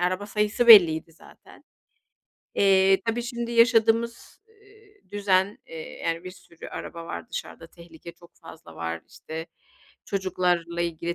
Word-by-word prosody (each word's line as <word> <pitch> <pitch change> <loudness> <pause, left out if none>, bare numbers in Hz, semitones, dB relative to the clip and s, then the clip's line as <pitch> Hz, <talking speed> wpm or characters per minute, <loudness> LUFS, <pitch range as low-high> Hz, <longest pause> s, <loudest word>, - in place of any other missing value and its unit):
araba 185 +3 -1
sayısı 210 +3 -1
belliydi 170 -7 +7
zaten. - - -19 0.9
Eee, 195 -1 +4
tabii 230 +1 -1
şimdi 235 0 -5
yaşadığımız, 230 0 +2
ııı, 420 -1 -24
düzen, 200 -1 +1
eee, 160 -1 -9
yani 165 +2 -2
bir 185 - -7
sürü 180 -2 -14
araba 170 -1 -8
var - - -7
dışarıda, 165 - -7
tehlike 170 0 -14
çok 170 0 -20
fazla 160 - -14
var. 85 0 -5
İşte 160 +1 -8 0.6
çocuklarla 180 -3 -1
ilgili 170 0 -3
185 Hz, 130 wpm, -25 LUFS, 170-225 Hz, 0.9 s, belliydi